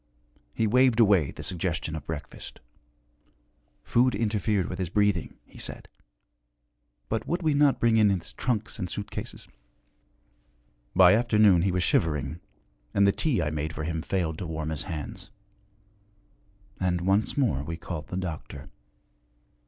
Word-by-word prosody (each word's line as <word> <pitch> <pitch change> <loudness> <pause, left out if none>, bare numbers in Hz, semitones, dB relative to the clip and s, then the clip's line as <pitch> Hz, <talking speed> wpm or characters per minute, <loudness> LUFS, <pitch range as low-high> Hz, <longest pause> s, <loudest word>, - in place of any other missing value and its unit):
He 115 - +1
waved 125 +1 +4
away 100 -10 +5
the - - -8
suggestion 85 -2 -2
of 75 -3 -7
breakfast. 75 -2 -7 1.2
Food 125 - +2
interfered 105 -3 0
with 90 - -6
his 90 -3 -2
breathing, 100 -2 +1
he - - -15
said; - - -5 1.2
but 110 - -2
would 175 +2 -1
we 155 -2 +3
not 145 -1 +3
bring 115 -1 +3
in 105 -2 +5
his 95 -4 -2
trunks 110 -5 -2
and 90 -3 -3
suitcases? 105 +3 -6 1.5
By 90 0 +8
afternoon 105 -5 +4
he 95 +1 +1
was 90 0 0
shivering, 80 -1 0 0.6
and 100 - +5
the 100 - +5
tea 120 - 0
I 75 - -1
made 80 +1 -3
for 80 - -5
him 80 0 -2
failed 80 -2 -2
to 90 - -4
warm 80 -1 -3
his 80 - -3
hands. 80 +4 -6 1.5
And 90 -2 0
once 95 +8 +1
more 115 - +2
we 80 +2 -5
called 80 -3 -6
the 90 - -5
doctor. 80 -5 -6
95 Hz, 145 wpm, -27 LUFS, 80-110 Hz, 1.5 s, By